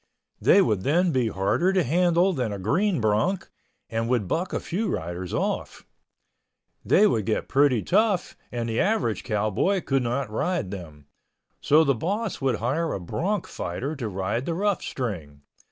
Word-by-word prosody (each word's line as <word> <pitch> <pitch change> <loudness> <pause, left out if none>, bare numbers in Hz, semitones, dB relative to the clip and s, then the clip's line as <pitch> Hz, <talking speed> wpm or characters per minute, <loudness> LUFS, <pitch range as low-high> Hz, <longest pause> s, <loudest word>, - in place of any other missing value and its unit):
They 200 - +6
would 105 - 0
then 170 - +2
be 130 -5 +1
harder 105 - +1
to 185 -2 +3
handle 175 +5 +3
than 125 -8 -2
a 100 - -4
green 175 - +1
bronc 110 - 0 0.4
and 115 +1 -2
would 120 -6 +1
buck 175 - -1
a - - -1
few 210 +6 -2
riders 85 - -4
off. - - -3 1.0
They 210 - +5
would 110 - +1
get 110 - -1
pretty 135 -5 +3
tough 200 -1 +1 0.2
and 120 -1 -3
the 115 0 -1
average 195 - +1
cowboy 110 - 0
could 135 -1 +1
not 120 0 -2
ride 155 - -1
them. 80 -7 -9 0.6
So 155 +3 +5
the 140 -3 +3
boss 200 - -3
would 135 -2 +1
hire 155 +8 -1
a - - -3
bronc 175 - -2
fighter 130 - -4
to 120 -5 -3
ride 100 +6 -2
the 170 - -1
rough 205 +1 0
string. 80 - -5
130 Hz, 170 wpm, -25 LUFS, 105-180 Hz, 1.0 s, They